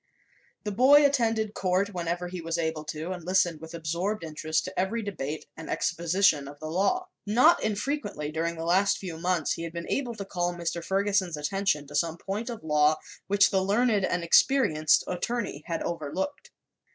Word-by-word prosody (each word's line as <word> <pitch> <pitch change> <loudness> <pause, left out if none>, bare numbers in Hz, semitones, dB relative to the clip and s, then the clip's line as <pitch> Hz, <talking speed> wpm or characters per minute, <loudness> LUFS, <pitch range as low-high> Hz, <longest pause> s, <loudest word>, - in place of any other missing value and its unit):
The 210 - -3
boy 275 +7 +6
attended 225 -6 +1
court 190 +1 0
whenever 175 0 -2
he 180 0 -6
was 165 +1 -2
able 160 -2 -2
to 155 +3 -5
and 180 -2 -6
listened 175 -3 +1
with 160 +1 -8
absorbed 170 +5 -2
interest 155 0 -2
to 185 0 -5
every 215 +5 -1
debate 155 -7 -4
and 160 - -9
exposition 170 -3 +1
of 145 +1 -11
the 155 0 -6
law. 365 - 0 0.2
Not 250 +11 +5
infrequently, 210 - -2
during 165 +2 -2
the 165 0 -5
last 190 +4 +3
few 170 -4 -7
months, 175 -3 0
he - - -2
had 165 0 -5
been 170 0 -5
able 245 -4 -1
to 200 -2 -6
call 175 -2 -2
Mr. 170 0 -3
Ferguson's 195 -3 0
attention 150 -1 0
to 145 - -13
some 165 +2 0
point 210 +7 -4
of 230 -6 -7
law 150 0 +3 0.3
which 205 +1 +4
the 190 -2 +2
learned 210 +1 +2
and 180 -1 0
experienced 170 - +4
attorney 185 -3 -3
had 165 -2 -2
overlooked. 170 - -4
180 Hz, 180 wpm, -27 LUFS, 160-205 Hz, 0.3 s, boy